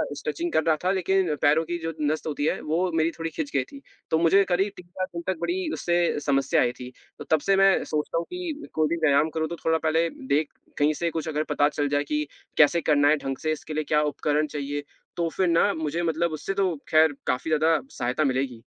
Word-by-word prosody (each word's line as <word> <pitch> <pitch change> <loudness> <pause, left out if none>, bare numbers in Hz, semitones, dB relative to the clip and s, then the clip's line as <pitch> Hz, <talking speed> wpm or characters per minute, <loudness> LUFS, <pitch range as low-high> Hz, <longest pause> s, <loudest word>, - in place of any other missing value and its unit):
Stretching 345 -7 -3
कर 160 - +3
रहा 160 0 +3
था, 185 - +2
लेकिन 190 -3 +1
पैरों 150 +3 +4
की 175 +2 -3
जो 165 0 -3
नस 150 +1 0
होती 145 -1 -2
है, - - 0
वो 175 +4 0
मेरी 160 +1 +2
थोड़ी 165 0 -5
खिंच 155 -2 -4
गई 135 - +3
थी, 275 - -13 0.3
तो 160 - +4
मुझे 170 +5 +5
करीब 190 +3 +1
3-4 180 +1 -5
दिन 170 - -4
तक 190 -3 0
बड़ी 355 -1 -1
उससे 175 -3 +1
समस्या 135 -1 +2
आई 120 - +2
थी। 125 0 -8 0.3
तो - - -6
तब 160 - +5
से 195 - +4
मैं 195 0 +4
सोचता 150 +2 -2
हूँ 170 - -1
कि, 345 -4 -5
कोई 155 -1 +2
भी 170 - 0
व्यायाम 145 +2 +3
करूँ 160 0 -2
तो 170 - -4
थोड़ा 160 0 +3
पहले 160 +1 +1 0.2
देख 145 +2 +1 0.3
कहीं 150 +1 +3
से 170 +2 -1
कुछ 160 0 -4
अगर 155 -1 -1
पता 145 0 +3
चल 145 -1 -1
जाए 145 0 +1
कि 150 0 -1 0.3
कैसे 160 +3 +5
करना 145 -1 +3
है 155 +1 +4
ढंग 135 -1 -3
से, 155 - -2
इसके 155 0 -5
लिए 155 0 -1
क्या 150 0 +2
उपकरण 150 +1 0
चाहिए? 145 0 -4 0.3
तो 170 -1 0
फिर 185 +3 0
ना 170 +4 +3
मुझे 160 +2 -2
मतलब 165 0 0
उससे 155 +5 -3
तो 190 -3 0
खैर 155 -2 +4
काफ़ी 125 +5 -1
ज़्यादा 160 +1 +3
सहायता 125 +5 -1
मिलेगी। 130 -4 -1
160 Hz, 235 wpm, -25 LUFS, 150-175 Hz, 0.3 s, मुझे